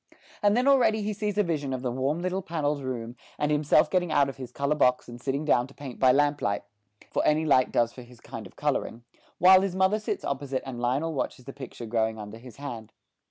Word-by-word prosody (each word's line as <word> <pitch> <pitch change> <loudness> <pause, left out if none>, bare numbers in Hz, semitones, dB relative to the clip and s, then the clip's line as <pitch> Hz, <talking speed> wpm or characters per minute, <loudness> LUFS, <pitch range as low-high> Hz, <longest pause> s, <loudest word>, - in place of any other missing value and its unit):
And 205 +1 +3
then 250 +2 +2
already 245 -6 +4
he 210 +1 -1
sees 210 -1 -3
a 210 - +4
vision 150 -6 -2
of 130 0 -4
the 125 - -1
warm 135 +7 -1
little 185 +1 -1
panelled 150 -5 -2
room, 120 -3 -5 0.2
and 150 0 0
himself 150 0 +4
getting 175 -3 +1
out 140 -2 +3
his 130 -2 -8
colour 140 +3 0
box 125 -4 +2
and 120 0 -10
sitting 140 +3 -2
down 125 -4 +3
to 135 - -18
paint 135 -4 -8
by 130 -1 +6
lamp 145 +2 +2
light 100 0 -1 0.5
for - - +1
any 155 +1 +2
light 130 -4 +4
does 120 0 +1
for 125 - -10
his 120 -1 -15
kind - - -8
of - - -21
colouring 115 +1 -2 0.3
while 185 +2 +7
his 195 -2 -2
mother 190 +3 +3
sits 210 - -4
opposite 140 -1 -2
and 130 -3 -6
Lionel 135 +7 0
watches 130 -3 -4
the 135 - -8
picture 130 -3 -8
growing 110 0 0
under 105 +1 -8
his 120 -2 -12
hand. 120 -6 -7
140 Hz, 230 wpm, -27 LUFS, 125-165 Hz, 0.5 s, while